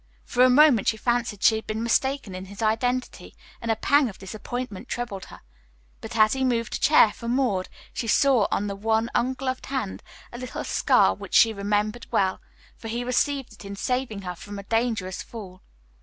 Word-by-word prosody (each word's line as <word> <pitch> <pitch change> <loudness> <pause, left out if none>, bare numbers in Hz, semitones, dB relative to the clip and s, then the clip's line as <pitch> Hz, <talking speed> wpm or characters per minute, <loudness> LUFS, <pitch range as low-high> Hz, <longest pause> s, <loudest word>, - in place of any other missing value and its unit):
For 250 - +3
a 255 - +6
moment 260 -5 +5
she 220 - +2
fancied 240 -3 -1
she 220 - +5
had 220 - -8
been 220 +1 -2
mistaken 265 -2 0
in 185 +1 -6
his 200 +3 -7
identity, 245 +3 -1 0.3
and 230 - -4
a 225 - +3
pang 285 +2 +3
of 195 - -11
disappointment 225 +3 -6
troubled 235 -6 -4
her; - - -13 0.6
but - - -7
as 215 0 +5
he 265 0 -1
moved 230 -3 0
a - - -2
chair 280 -7 +6
for 235 - -8
Maud, 240 -7 0 0.2
she 230 - -4
saw 255 -1 +4
on 205 - 0
the 200 -1 -3
one 220 +3 0
ungloved 260 +1 -1
hand 255 -8 -3 0.3
a 240 - -7
little 255 -1 -5
scar - - +3
which - - -7
she 225 -1 +6
remembered 210 +3 -1
well, 190 -1 +1 0.3
for 225 - -10
he 235 +2 -3
received 265 0 0
it 210 - -14
in 200 0 -7
saving 245 -2 -2
her 180 -1 -4
from 205 +4 -9
a 200 - -7
dangerous 225 -4 -1
fall. 190 -5 -10
225 Hz, 195 wpm, -25 LUFS, 205-250 Hz, 0.6 s, a